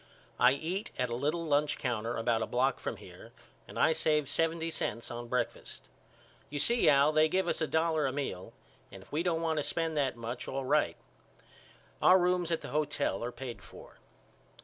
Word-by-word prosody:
I 125 +1 +6
eat 175 +8 -3
at 125 -2 -1
a - - -1
little 150 +6 -1
lunch 150 -1 +1
counter 120 -3 -2
about 115 0 +1
a - - -1
block 130 +2 +1
from - - -4
here - - -13 0.4
and - - -10
I 160 - +4
saved 150 -3 +1
seventy 165 +2 0
cents 115 -4 -3
on 120 0 -6
breakfast. 125 +1 -3 0.6
You 145 - -5
see 235 +11 +4
Al 140 +1 +5
they 155 0 +4
give 190 +3 +1
us - - -1
a 160 - +1
dollar 160 0 +1
a - - -1
meal 130 -10 -4 0.4
and 95 0 -11
if - - -23
we 150 - 0
don't 170 -2 0
want 160 -1 0
to 150 - +1
spend 165 0 -2
that 135 -4 0
much 120 +2 -5
all 135 0 -3
right. - - +2 1.0
Our 185 - +7
rooms 180 -1 +1
at 165 - 0
the - - -7
hotel 150 -9 -1
are 120 - -3
paid 125 -1 -7
for. - - -14
145 Hz, 195 wpm, -31 LUFS, 125-160 Hz, 1.0 s, Our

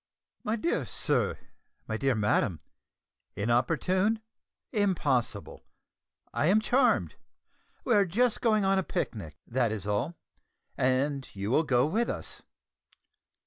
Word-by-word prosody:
"My 215 - 0
dear 285 +10 0
sir, - - 0 0.5
my 110 - -2
dear 135 +2 +1
madam, 105 -3 +1 0.8
inopportune! 180 - +1 0.5
impossible! 145 - 0 0.7
I 150 - +1
am 200 +5 +5
charmed. 245 +5 +2 0.7
We 245 - +2
are 205 -2 +5
just 230 +7 +1
going 215 -4 +3
on 195 0 +3
a - - 0
picnic, 80 - -4
that 120 -2 0
is 105 -3 -4
all, 105 +11 -1 0.6
and 130 +2 0
you 100 +2 -3
will 150 - +4
go 125 -3 +3
with 220 +10 0
us. - - -5
140 Hz, 120 wpm, -29 LUFS, -, 0.8 s, am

